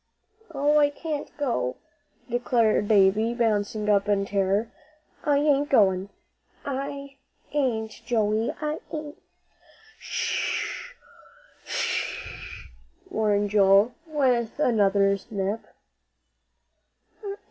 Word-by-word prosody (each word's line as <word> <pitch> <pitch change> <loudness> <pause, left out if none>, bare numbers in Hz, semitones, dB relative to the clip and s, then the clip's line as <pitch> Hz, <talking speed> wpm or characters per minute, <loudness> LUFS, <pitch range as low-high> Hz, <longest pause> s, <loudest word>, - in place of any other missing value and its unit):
"Oh, 295 0 +3
I 290 -1 +5
can't 295 0 -5
go," 130 - -1 0.5
declared 235 -3 +2
Davie, 215 +3 +4
bouncing 215 -2 0
up 205 -1 +3
in 200 -1 +2
terror. 200 +3 0 0.5
"I 290 -2 +3
ain't 290 0 +2
goin'. 195 -5 +3 0.6
I 280 0 -5 0.4
ain't, 235 -7 0
Joey. 220 -1 +1
I 305 +1 -2
ain't 300 -1 -6 0.4
" 440 0 -26
"Sh - - -2 0.8
sh!" 470 -1 -1 1.0
warned 205 -2 +1
Joel, 200 +3 +5
with 255 -6 0
another 200 -6 +3
nip. 200 0 -2
230 Hz, 90 wpm, -26 LUFS, 205-285 Hz, 1.0 s, I